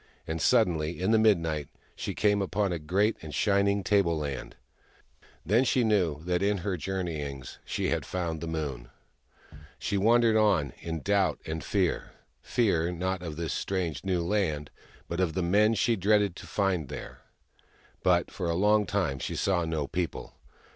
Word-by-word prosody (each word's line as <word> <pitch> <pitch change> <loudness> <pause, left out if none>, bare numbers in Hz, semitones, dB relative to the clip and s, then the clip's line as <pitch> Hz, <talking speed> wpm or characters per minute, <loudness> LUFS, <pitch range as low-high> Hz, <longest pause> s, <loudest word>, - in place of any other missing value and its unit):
And, 80 -1 -3
suddenly, 85 - +2
in 95 +4 +1
the 110 - +5
midnight, 80 -9 +2 0.3
she - - -4
came 105 -1 +2
out - - +1
upon 100 +1 0
a 85 - -3
great 95 +8 +1
and 80 -2 -7
shining 100 -1 +2
tableland: 85 -9 0 0.9
then 110 +8 +4
she 130 -1 +2
knew 90 -9 +1
that 90 0 0
in 100 +1 +2
her 100 -3 0
journeyings 80 -7 -4
she - - -2
had - - 0
found 85 -3 -3
the 85 - -4
Moon! 70 -7 -4 0.9
She 100 -2 -1
wandered 115 +2 +4
on, 95 - +3
in 80 -2 -4
doubt 100 -6 +2
and 80 -1 -4
fear - - -1 0.2
— - - -43
fear, 90 -8 +1
not 90 +1 -2
of 80 -4 -5
this 80 -1 -3
strange 85 -8 -2
new 90 -3 0
land, 85 -6 -1 0.4
but 85 - -4
of 90 -4 +1
the 95 - 0
men 105 +5 +3
she 115 +2 +2
dreaded 100 -1 +2
to - - -10
find 95 -8 0
there. - - -8 0.8
But 90 -1 +2
for 90 -3 -3
a 85 - 0
long 105 +3 +3
time 90 -10 -1
she - - -4
saw 90 -4 +1
no 80 -3 -1
people. 85 +3 -4
90 Hz, 170 wpm, -28 LUFS, 80-100 Hz, 0.9 s, the